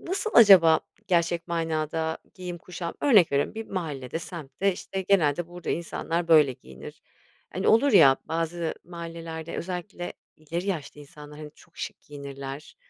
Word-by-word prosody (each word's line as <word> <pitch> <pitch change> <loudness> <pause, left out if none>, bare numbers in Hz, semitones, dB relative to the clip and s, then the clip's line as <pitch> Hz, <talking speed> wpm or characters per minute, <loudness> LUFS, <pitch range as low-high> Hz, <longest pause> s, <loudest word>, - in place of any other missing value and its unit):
nasıl 390 +5 -3
acaba 180 -8 +8 0.3
gerçek 170 -1 +1
manada 160 -1 -2 0.2
giyim 180 -1 -7
kuşam? 170 0 -7
Örnek 210 - +5
veriyorum, 140 +9 0
bir 225 0 -6
mahallede, 155 -6 -4
semtte, 170 +3 -3
işte, 190 +1 -5
genelde 175 -4 +2
burada 175 0 -6
insanlar 170 0 -2
böyle 150 -5 +6
giyinir. 65 - -13 0.5
Hani, 190 - 0
olur 235 +4 +4
ya, 140 -9 +7
bazı 165 +1 -2
mahallelerde 165 -1 -7
özellikle 180 0 -5 0.2
ileri 165 +4 -5
yaşta 150 -6 -4
insanlar, 150 +1 -12
hani, 150 - -8
çok - - -21
şık - - -6
giyinirler. 140 0 -9
165 Hz, 140 wpm, -26 LUFS, 150-180 Hz, 0.5 s, acaba